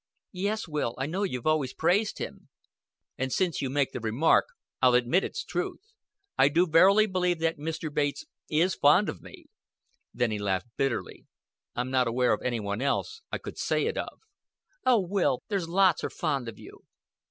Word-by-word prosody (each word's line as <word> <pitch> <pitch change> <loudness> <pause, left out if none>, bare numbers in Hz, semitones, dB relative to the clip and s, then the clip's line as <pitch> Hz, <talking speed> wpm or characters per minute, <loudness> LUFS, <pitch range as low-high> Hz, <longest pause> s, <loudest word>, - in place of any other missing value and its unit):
"Yes, 205 +4 -2
Will, 150 -7 -2
I 135 - -2
know 175 +7 -3
you've 125 - -2
always 155 -5 +1
praised 190 +6 +1
him." - - -7 0.7
"And 130 0 -1
since 180 0 0
you 135 - -2
make 140 0 0
the - - -5
remark, 115 +8 +3 0.4
I'll 125 -1 +5
admit 125 +10 +3
its 460 - -4
truth. 435 -1 -5 0.5
I 140 - +6
do 170 +5 +3
verily 190 +6 +5
believe 180 -3 0
that 165 0 0
Mr. 155 0 -4
Bates 145 -1 -1 0.2
is 170 +4 +2
fond 150 +8 +4
of - - -7
me." - - -13 0.7
Then 120 -2 0
he 105 - -2
laughed 100 +3 -2
bitterly. 135 -4 -3 0.5
"I'm 125 +1 -2
not 130 -2 +2
aware 125 +2 +2
of - - -2
any 120 -2 -1
one 100 +2 -3
else 435 - -1
I - - -1
could - - -9
say - - 0
it - - -1
of." - - -5 0.7
"Oh, 245 -3 +6
Will 185 -8 0
there's 190 -5 -2
lots 185 -1 +3
are - - -1
fond 140 -7 -2
of 110 - -11
you." - - -13
155 Hz, 185 wpm, -28 LUFS, 125-185 Hz, 0.7 s, I